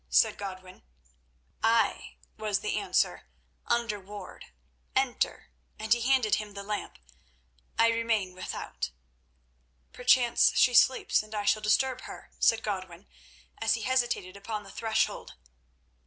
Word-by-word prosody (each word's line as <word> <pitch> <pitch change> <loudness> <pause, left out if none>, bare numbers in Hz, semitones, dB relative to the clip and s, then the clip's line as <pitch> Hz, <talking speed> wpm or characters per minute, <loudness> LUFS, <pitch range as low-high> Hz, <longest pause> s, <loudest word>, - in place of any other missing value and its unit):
said 60 +1 +4
Godwin. 185 -2 -8 0.8
"Ay," 225 -1 +1 0.2
was 210 -3 -1
the 210 - -2
answer, 400 - 0 0.4
"under 235 -3 0
ward. 205 +2 -10 0.5
Enter," 265 -2 0 0.3
and 220 +1 +2
he 240 - -1
handed 250 -3 +2
him 210 -1 -7
the 200 - -6
lamp. 210 +1 -4 0.8
"I 230 - +5
remain 225 -5 0
without." 185 - -5 1.0
"Perchance 250 -1 +4
she 250 - +5
sleeps, 255 +2 +4
and 215 0 -10
I 205 -1 -2
shall 205 +1 +3
disturb 255 +5 +1
her," - - -11
said 225 -1 +3
Godwin, 185 -3 -5 0.5
as 225 0 +2
he 225 - -5
hesitated 240 -7 0
upon 210 +1 -5
the 195 - -12
threshold. 220 0 -1
215 Hz, 125 wpm, -29 LUFS, 200-235 Hz, 1.0 s, I